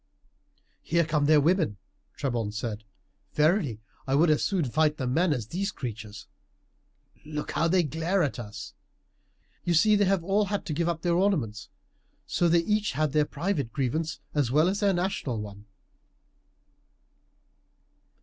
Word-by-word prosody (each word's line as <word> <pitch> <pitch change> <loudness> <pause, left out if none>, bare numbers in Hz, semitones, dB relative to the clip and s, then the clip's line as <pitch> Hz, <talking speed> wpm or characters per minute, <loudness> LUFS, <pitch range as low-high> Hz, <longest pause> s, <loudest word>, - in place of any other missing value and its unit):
"Here 170 0 +1
come 150 -2 +1
their 155 -1 +6
women!" 160 - +2 0.4
Trebon 120 -7 -2
said; 110 -1 -4 0.5
"verily 150 - +2 0.3
I 135 - +1
would 155 +2 +4
as 150 - +2
soon 185 -6 +1
fight 150 +4 +1
the 130 - -3
men 160 +8 +2
as 125 -7 -1
these 195 +4 -2
creatures. 110 -4 -7 1.0
Look 150 0 -5
how 165 - +1
they 180 +1 +3
glare 165 +5 0
at 140 -4 -2
us! 105 -2 -8 0.9
You 175 - +1
see 210 +7 +5
they 205 0 +3
have 190 -2 +1
all 200 +3 +2
had 200 +1 -3
to 155 - -3
give 170 +3 0
up 165 -1 -3
their 175 -1 +2
ornaments, 135 - 0 0.6
so 175 - +1
they 170 0 +4
have - - -11
each 210 -3 +1
their 150 0 +2
private 150 - -2
grievance 155 +4 -2
as 145 -5 +1
well 155 +7 +3
as 200 +1 -1
their 200 -2 +3
national 175 - -1
one." 105 0 -9
155 Hz, 155 wpm, -27 LUFS, 125-175 Hz, 1.0 s, their